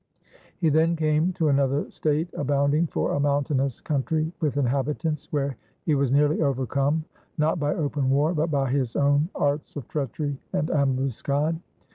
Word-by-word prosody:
He 165 -4 +2
then 160 +3 +3
came 155 +2 +2
to 165 -4 +1
another 140 0 +1
state, 155 +2 0
abounding, 145 +3 +1
for - - -1
a - - 0
mountainous 140 -2 0
country, 155 +2 -1
with 150 -4 -1
inhabitants; 145 +3 -1
where 140 -4 -1 0.3
he 155 - +2
was 140 -3 +1
nearly 145 +3 +3
overcome, 140 +2 0 0.3
not 160 +2 +1
by 145 0 0
open 145 -3 -1
war, 145 +5 +3
but 160 0 0
by 135 -4 0
his 130 -4 0
own 145 +3 +3
arts 145 +1 -1
of 140 -6 -6
treachery 145 0 -3
and 155 - 0
ambuscade. 140 +3 0
145 Hz, 155 wpm, -25 LUFS, 140-155 Hz, 0.3 s, then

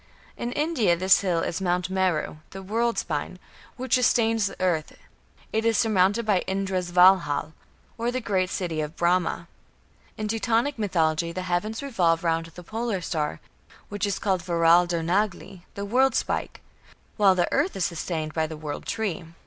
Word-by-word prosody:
In 240 - -4
India 260 - +1
this 190 +2 +4
hill 175 -4 0
is 175 +3 -3
Mount 180 0 0
Meru, 185 -5 0
the 195 0 -9
"world 230 +4 0
spine", 160 +3 -3 0.4
which 255 -1 -3
"sustains 225 -4 +3
the 195 - -9
earth"; 170 -4 -1 0.6
it 220 0 +1
is 225 -2 +2
surmounted 210 +1 +2
by 205 -4 +3
Indra's 190 -2 -2
Valhal, 180 -4 +4 0.5
or 235 +1 0
"the 255 - -2
great 190 -6 0
city 170 -5 -2
of 150 +1 -5
Brahma". 175 +1 0 0.7
In 215 - -3
Teutonic 230 +4 0
mythology 170 -5 0
the 185 +2 -5
heavens 205 +8 -2
revolve 175 -11 +1
round 165 -1 0
the 170 +2 -12
Polar 220 +1 -3
Star, 150 - -2 0.5
which 205 0 -2
is 200 - -1
called 190 -4 0
"Veraldar 170 0 +3
nagli", 190 +1 -1
the 200 - -4
"world 255 +4 +2
spike"; - - -2 0.6
while 195 -3 +5
the 175 - +2
earth 300 +8 +1
is 185 - 0
sustained 160 -2 -3
by 160 -1 0
the 160 0 -7
"world 150 -1 -6
tree". 200 -6 -2
185 Hz, 165 wpm, -25 LUFS, 170-220 Hz, 0.7 s, while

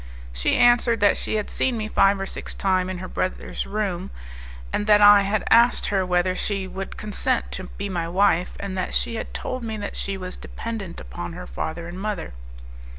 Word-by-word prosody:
She - - +1
answered 240 -1 +4
that 205 - +5
she - - -3
had 210 -1 -2
seen 255 -3 0
me 215 -1 -3
five 195 -2 +3
or 195 - -2
six - - -6
times 185 -1 +1
in 185 - -4
her 185 +1 -6
brother's 185 - -3
room, 195 -3 -2 0.6
that 210 0 +4
I 205 0 +8
had 200 +1 0
asked 235 +1 +5
her 195 -2 +2
whether 180 0 +1
she 195 0 -1
would 190 0 -6
consent 225 +4 -1
to 185 - -5
be 200 +2 -6
my 175 -4 -2
wife, 180 -1 +2
and 200 -1 -4
that 185 - -2
she 235 - 0
had 225 - -5
told 255 -1 -4
me 220 -1 -4
that 205 -1 -5
she 195 -1 -3
was 185 -1 -6
dependent 215 -7 -6
upon - - -7
her - - -7
father 160 - -5
and 180 +2 -7
mother. 205 - -3
195 Hz, 200 wpm, -24 LUFS, 185-215 Hz, 0.6 s, I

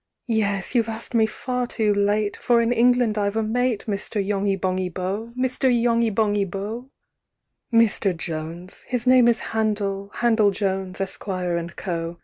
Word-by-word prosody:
"Yes! 205 -4 0
you've 230 -3 +2
asked 225 +3 -5
me 220 -2 +4
far 250 +2 -3
too 215 -3 +1
late, 205 +1 +1
"For 240 -1 +2
in 230 +1 +2
England 245 -2 +3
I've 200 0 0
a 225 - +1
mate, 240 0 0
"Mr. 205 +1 -3
Yonghy 200 0 0
Bonghy 185 0 -1
Bò! 195 +6 -4
"Mr. 260 +1 +1
Yonghy 235 -1 +2
Bonghy 205 -1 +1
Bò! 205 +7 -5 0.8
VI. 230 - +3
"Mr. 195 -4 0
Jones 165 +2 -6
(his 245 -1 -2
name 255 -1 +6
is 235 - +3
Handel, 205 -3 -1
"Handel 225 -3 +3
Jones, 190 -2 -2
Esquire, 185 -3 -2
& - - -17
Co.) 170 -2 -4
210 Hz, 160 wpm, -23 LUFS, 195-235 Hz, 0.8 s, name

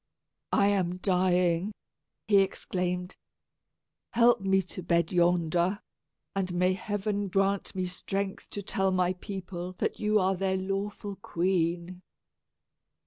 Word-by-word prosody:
"I 200 -1 +4
am 180 -3 +1
dying," 180 0 +2 0.5
he 205 -2 +6
exclaimed. 180 -1 -1 1.0
"Help 235 -2 +5
me 195 0 +2
to 185 - -8
my - - -13
bed 170 0 +2
yonder, 175 +2 +2 0.6
and 190 -2 -1
may 180 +1 +3
heaven 205 +1 -2
grant 195 +1 0
me 185 -1 -1
strength 195 +2 -4
to 205 - -5
tell 195 -1 +1
my 185 -1 +2
people 185 -1 -6
that - - -2
you 215 0 +2
are 190 0 +2
their 190 0 0
lawful 195 +1 -3
queen." 175 -1 -1
185 Hz, 125 wpm, -29 LUFS, 180-195 Hz, 1.0 s, he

